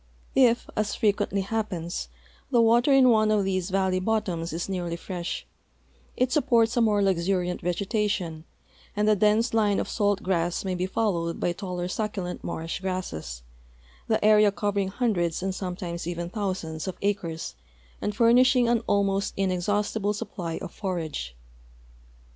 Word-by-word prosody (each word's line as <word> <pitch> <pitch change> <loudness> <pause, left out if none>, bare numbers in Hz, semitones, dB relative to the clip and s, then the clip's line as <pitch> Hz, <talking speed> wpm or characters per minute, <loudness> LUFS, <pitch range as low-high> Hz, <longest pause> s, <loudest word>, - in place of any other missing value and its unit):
If, 240 -3 +4
as 210 -1 -1
frequently 200 -2 +1
happens, 190 - -3 0.4
'the 240 - +3
water 235 +4 +4
in 265 -2 +6
one 215 -2 +4
of 210 -2 +3
these 185 -1 -1
valley 190 -1 +1
bottoms 185 -5 -1
is 170 +2 -3
nearly 175 -3 -3
fresh, 175 0 -5 0.7
it 255 0 +1
supports 240 -6 +3
a 240 - +3
more 210 -3 +3
luxuriant 180 -1 0
vegetation, 180 -3 -1 0.5
and 210 +1 +1
the 215 - +5
dense 215 +4 +2
line 210 -3 +3
of - - -2
salt 205 -2 0
grass 175 0 0
may 190 - -1
be 180 +1 -1
followed 175 -5 -1
by 175 - +1
taller 180 -1 -4
succulent 190 -2 -3
marsh 165 +2 -4
grasses, 80 - -4 0.6
the - - +1
area 210 -1 +6
covering 200 -1 -1
hundreds 190 -6 0
and 190 0 -1
sometimos 180 -3 -5
even 175 0 -3
thou 200 -1 -1
sands 160 -3 -6
of 185 - -4
acres 185 -5 -2 0.5
and 205 - -2
furnishing 245 +2 +5
an 235 0 +3
almost 200 -1 +1
inexhaustible 205 +2 0
sup})ly 175 -5 -5
of 185 - -7
forage. 160 - -4
195 Hz, 150 wpm, -26 LUFS, 175-215 Hz, 0.7 s, in